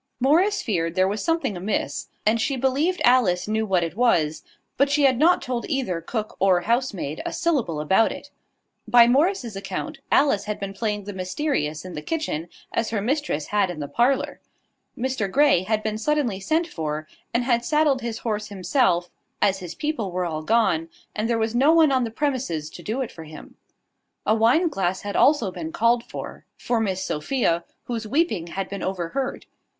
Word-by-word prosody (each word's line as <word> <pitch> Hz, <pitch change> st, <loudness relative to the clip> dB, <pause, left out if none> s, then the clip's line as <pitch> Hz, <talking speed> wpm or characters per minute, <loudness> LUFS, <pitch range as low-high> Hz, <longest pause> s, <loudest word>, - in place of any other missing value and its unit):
Morris 345 Hz, +11 st, +3 dB
feared 165 Hz, -6 st, -1 dB
there 185 Hz, 0 st, +3 dB
was 205 Hz, +2 st, -2 dB
something 330 Hz, -, 0 dB
amiss; 195 Hz, +4 st, -2 dB, 0.2 s
and 220 Hz, +2 st, +3 dB
she 275 Hz, -, 0 dB
believed 275 Hz, +8 st, +1 dB
Alice 225 Hz, -9 st, +3 dB
knew 220 Hz, +1 st, 0 dB
what 185 Hz, -3 st, +2 dB
it 165 Hz, 0 st, -4 dB
was: 170 Hz, -10 st, +2 dB, 0.3 s
but 280 Hz, +1 st, +3 dB
she 290 Hz, 0 st, +2 dB
had 260 Hz, -3 st, +4 dB
not 345 Hz, +3 st, +4 dB
told 245 Hz, -2 st, -2 dB
either 250 Hz, -, -1 dB
cook 215 Hz, +5 st, -4 dB
or 185 Hz, -2 st, +4 dB
housemaid 210 Hz, -, -1 dB
a -, -, -3 dB
syllable 265 Hz, -, 0 dB
about 190 Hz, +9 st, +3 dB
it. -, -, -9 dB, 0.6 s
By 240 Hz, -1 st, +7 dB
Morris's 270 Hz, -, +1 dB
account, 275 Hz, +9 st, -5 dB
Alice 240 Hz, -9 st, +3 dB
had 210 Hz, 0 st, -4 dB
been 195 Hz, 0 st, -5 dB
playing 210 Hz, -1 st, -2 dB
the 205 Hz, +1 st, -7 dB
mysterious 185 Hz, -, -2 dB
in 185 Hz, -, -7 dB
the 150 Hz, -, -5 dB
kitchen 175 Hz, -, -3 dB, 0.2 s
as 230 Hz, -, 0 dB
her 220 Hz, -, -1 dB
mistress 245 Hz, -, -1 dB
had 205 Hz, -2 st, +1 dB
in 175 Hz, -3 st, -6 dB
the 145 Hz, -, -4 dB
parlour. 250 Hz, -, +1 dB, 0.6 s
Mr 250 Hz, -5 st, -1 dB
Grey 285 Hz, -9 st, +4 dB
had 215 Hz, +3 st, -1 dB
been 215 Hz, 0 st, -2 dB
suddenly 260 Hz, -6 st, 0 dB
sent 320 Hz, -, +1 dB
for, 155 Hz, -, -4 dB, 0.2 s
and 235 Hz, +1 st, +1 dB
had 240 Hz, -1 st, +1 dB
saddled 300 Hz, -2 st, +2 dB
his 230 Hz, -1 st, -3 dB
horse 210 Hz, -2 st, -1 dB
himself, 190 Hz, -2 st, +1 dB, 0.3 s
as 195 Hz, -1 st, +2 dB
his 180 Hz, -3 st, -7 dB
people 270 Hz, -11 st, -2 dB
were 180 Hz, 0 st, -1 dB
all 155 Hz, -2 st, -3 dB
gone, 180 Hz, -4 st, +1 dB, 0.3 s
and 220 Hz, +2 st, -1 dB
there 235 Hz, -, +2 dB
was 225 Hz, 0 st, -1 dB
no 275 Hz, +6 st, +4 dB
one 320 Hz, -3 st, +5 dB
on 260 Hz, -2 st, +2 dB
the -, -, -4 dB
premises 230 Hz, -, -2 dB
to -, -, -10 dB
do 220 Hz, +9 st, -3 dB
it 255 Hz, -, -4 dB
for 160 Hz, -, -10 dB
him. 155 Hz, 0 st, -12 dB, 0.7 s
A 215 Hz, -, +3 dB
wine 235 Hz, +11 st, +4 dB
glass 190 Hz, -, -1 dB
had 205 Hz, 0 st, -5 dB
also 275 Hz, -10 st, +4 dB
been 320 Hz, -, -6 dB
called 235 Hz, -7 st, +2 dB
for, -, -, -8 dB
for 240 Hz, -2 st, -1 dB
Miss 190 Hz, -3 st, -1 dB
Sophia, 170 Hz, -, 0 dB, 0.2 s
whose 230 Hz, -2 st, -4 dB
weeping 250 Hz, -, 0 dB
had 190 Hz, +3 st, -4 dB
been 200 Hz, -, -6 dB
overheard. 190 Hz, +8 st, -3 dB
220 Hz, 190 wpm, -24 LUFS, 185-270 Hz, 0.7 s, By